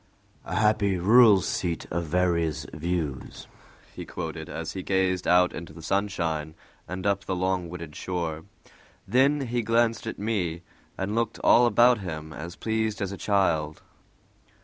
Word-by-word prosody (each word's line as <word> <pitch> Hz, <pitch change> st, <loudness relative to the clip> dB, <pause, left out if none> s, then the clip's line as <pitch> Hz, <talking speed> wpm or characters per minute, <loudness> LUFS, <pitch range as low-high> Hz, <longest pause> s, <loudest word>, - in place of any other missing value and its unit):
"A 90 Hz, -, -4 dB
happy, 105 Hz, -2 st, +2 dB
rural 105 Hz, +2 st, +6 dB
seat 85 Hz, -1 st, -2 dB
of 85 Hz, 0 st, -1 dB
various 85 Hz, -3 st, 0 dB
views," 80 Hz, -3 st, -4 dB, 0.5 s
he -, -, -6 dB
quoted, -, -, -6 dB
as 85 Hz, 0 st, -5 dB
he 95 Hz, -, -5 dB
gazed 95 Hz, -1 st, 0 dB
out 90 Hz, 0 st, +4 dB
into 80 Hz, -1 st, -8 dB
the 80 Hz, 0 st, -12 dB
sunshine 85 Hz, -5 st, -1 dB, 0.3 s
and 95 Hz, +1 st, -6 dB
up 100 Hz, -1 st, 0 dB
the 95 Hz, -, -2 dB
long 90 Hz, -1 st, -1 dB
wooded 85 Hz, -4 st, -8 dB
shore. 85 Hz, -3 st, -4 dB, 0.6 s
Then 135 Hz, +7 st, +3 dB
he 120 Hz, -2 st, -1 dB
glanced 115 Hz, 0 st, +1 dB
at -, -, -4 dB
me, 90 Hz, -6 st, -2 dB, 0.3 s
and 95 Hz, +2 st, -2 dB
looked 115 Hz, 0 st, -1 dB
all 120 Hz, 0 st, +6 dB
about 120 Hz, 0 st, +5 dB
him 80 Hz, -5 st, -6 dB
as 85 Hz, +2 st, -7 dB
pleased 110 Hz, -1 st, -1 dB
as 100 Hz, -1 st, -2 dB
a -, -, -5 dB
child. 85 Hz, -8 st, 0 dB
95 Hz, 150 wpm, -26 LUFS, 85-105 Hz, 0.6 s, rural